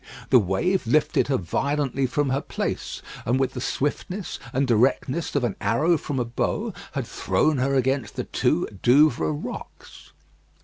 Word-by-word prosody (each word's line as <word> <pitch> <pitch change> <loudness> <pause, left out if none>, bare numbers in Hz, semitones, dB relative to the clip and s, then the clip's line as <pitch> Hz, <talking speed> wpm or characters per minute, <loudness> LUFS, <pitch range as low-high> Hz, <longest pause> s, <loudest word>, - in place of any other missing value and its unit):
The 130 - +8
wave 120 - 0
lifted 150 +6 +2
her 135 -2 +2
violently 135 - -1
from 145 +2 0
her 135 +2 +1
place, - - -4 0.2
and 125 +3 +1
with 135 - 0
the 125 - -5
swiftness 180 - -3
and 135 +3 +1
directness 130 +7 +1
of 140 - +2
an 115 -5 0
arrow 155 +9 +3
from 145 -2 -3
a 120 - 0
bow 115 0 -2 0.2
had - - -2
thrown 155 -4 +1
her 135 +2 +1
against 130 -3 0
the - - -2
two - - +1 0.2
Douvres 120 - +3
rocks. - - -9
135 Hz, 160 wpm, -24 LUFS, 120-145 Hz, 0.2 s, The